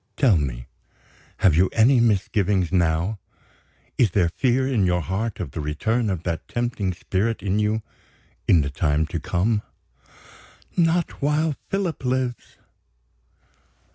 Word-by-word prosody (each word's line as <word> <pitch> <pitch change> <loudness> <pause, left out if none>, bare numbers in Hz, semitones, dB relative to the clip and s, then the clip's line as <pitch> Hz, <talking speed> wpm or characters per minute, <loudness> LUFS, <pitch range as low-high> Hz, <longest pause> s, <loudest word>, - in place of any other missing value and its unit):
Tell 130 -9 +4
me 60 -6 -2 0.7
have 90 -6 +4
you 90 +3 +4
any 120 +3 +5
misgivings 100 -4 +1
now? 90 +3 +1 0.8
Is 120 - +5
there 90 -2 +2
fear 130 +6 +1
in 120 -7 +1
your 90 0 +1
heart 95 +7 -3
of 70 - -4
the 80 - -5
return 110 +10 -1
of 90 -4 -3
that 85 -2 -3
tempting 120 -5 -2
spirit 100 +6 -2
in 100 +1 0
you, 105 +1 0 0.6
in 85 - +5
the 70 0 -3
time 75 +2 +1
to 85 +1 -4
come?" 105 +6 0 1.1
"Not 170 -1 +1
while 150 +2 +1 0.2
Philip 185 -8 -2
lives!" 125 -1 -2
105 Hz, 135 wpm, -23 LUFS, 85-120 Hz, 1.1 s, any